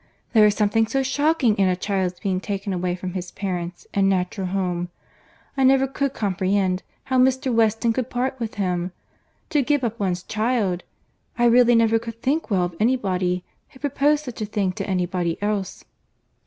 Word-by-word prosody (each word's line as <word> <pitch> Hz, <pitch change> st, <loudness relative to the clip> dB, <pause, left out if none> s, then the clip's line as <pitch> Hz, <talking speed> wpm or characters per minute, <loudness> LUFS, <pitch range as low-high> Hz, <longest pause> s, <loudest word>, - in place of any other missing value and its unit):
There 215 Hz, -2 st, +7 dB
is 210 Hz, -, +1 dB
something 220 Hz, +2 st, +2 dB
so 270 Hz, +3 st, 0 dB
shocking 280 Hz, -3 st, +2 dB
in 195 Hz, -, +4 dB
a 185 Hz, -, +2 dB
child's 185 Hz, -1 st, -2 dB
being 190 Hz, -2 st, -1 dB
taken 200 Hz, -1 st, -3 dB
away 180 Hz, 0 st, -1 dB
from 180 Hz, 0 st, -6 dB
his 180 Hz, -1 st, -4 dB
parents 180 Hz, -3 st, -4 dB
and 195 Hz, -1 st, +3 dB
natural 185 Hz, +1 st, -1 dB
home! 180 Hz, -2 st, -2 dB, 0.7 s
I 270 Hz, -, +1 dB
never 270 Hz, 0 st, +5 dB
could 270 Hz, 0 st, -2 dB
comprehend 190 Hz, -1 st, 0 dB, 0.2 s
how 260 Hz, -1 st, +1 dB
Mr. 260 Hz, 0 st, +2 dB
Weston 225 Hz, 0 st, +2 dB
could 255 Hz, +1 st, -2 dB
part 260 Hz, +2 st, -2 dB
with 225 Hz, -2 st, -4 dB
him. 180 Hz, -2 st, -1 dB, 0.6 s
To 295 Hz, -, +3 dB
give 285 Hz, +1 st, +1 dB
up 235 Hz, -1 st, -2 dB
one's 185 Hz, -3 st, -1 dB
child! 215 Hz, -5 st, 0 dB, 0.6 s
I 240 Hz, -, +3 dB
really 240 Hz, 0 st, +6 dB
never 225 Hz, 0 st, +4 dB
could 230 Hz, 0 st, -8 dB
think 280 Hz, +6 st, 0 dB
well 190 Hz, -4 st, +2 dB
of 175 Hz, -1 st, -3 dB
any 240 Hz, +4 st, +3 dB
body 180 Hz, -5 st, -1 dB, 0.3 s
who -, -, -17 dB
proposed 290 Hz, +1 st, +1 dB
such 245 Hz, -4 st, -7 dB
a -, -, 0 dB
thing 205 Hz, -2 st, -1 dB
to 185 Hz, -, -5 dB
any 180 Hz, -2 st, +1 dB
body 175 Hz, -2 st, -2 dB
else." 205 Hz, -2 st, -3 dB
210 Hz, 185 wpm, -23 LUFS, 185-250 Hz, 0.7 s, There